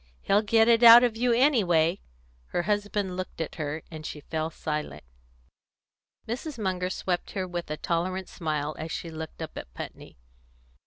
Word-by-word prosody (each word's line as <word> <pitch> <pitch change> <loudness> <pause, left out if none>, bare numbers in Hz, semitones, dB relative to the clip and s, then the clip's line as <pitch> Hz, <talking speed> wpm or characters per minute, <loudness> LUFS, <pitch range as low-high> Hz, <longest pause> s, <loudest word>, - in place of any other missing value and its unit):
"He'll 200 +2 +3
get 225 +1 +4
it 230 0 +5
out 235 +1 +10
of 240 -3 +1
you 245 +2 +1
anyway." 200 - +3 0.5
Her 175 - -1
husband 205 -1 -1
looked 185 -2 -6
at 160 - -3
her, 150 +1 -3
and 155 -1 -8
she 155 - -6
fell 160 +1 -3
silent. 150 - -4 1.2
Mrs. 255 +6 -4
Munger 185 -4 -1
swept 180 -1 -2
her 190 -2 -2
with 175 -2 -5
a 155 - -3
tolerant 185 +3 -2
smile 155 -2 -3
as 160 +1 -5
she 165 - -5
looked 160 0 -7
up 160 - -8
at - - -11
Putney. - - -9
180 Hz, 165 wpm, -27 LUFS, 160-215 Hz, 1.2 s, out